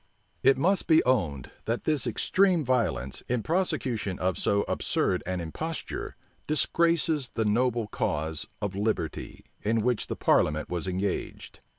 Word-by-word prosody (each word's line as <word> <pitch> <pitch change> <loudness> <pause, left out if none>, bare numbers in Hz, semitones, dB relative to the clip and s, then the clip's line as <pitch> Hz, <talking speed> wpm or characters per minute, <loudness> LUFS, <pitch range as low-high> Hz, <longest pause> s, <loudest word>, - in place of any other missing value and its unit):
It 135 0 +5
must 185 +8 +2
be 160 -1 +5
owned, 85 - 0
that 115 +2 -1
this 150 -5 +1
extreme 180 - +2
violence, 105 - 0
in 120 -2 0
prosecution 135 - -1
of 90 -1 0
so 100 +4 +1
absurd 90 - 0
an 90 0 -1
imposture, 155 - -5 0.3
disgraces 160 -2 +2
the 110 - -1
noble 120 +2 +1
cause 80 -5 -2 0.2
of 100 -2 -1
liberty, 105 +2 -3 0.2
in 110 +1 +1
which 125 -2 0
the - - -3
parliament 75 0 +2
was 90 +1 -2
engaged. 95 +1 -3
115 Hz, 135 wpm, -28 LUFS, 95-150 Hz, 0.3 s, It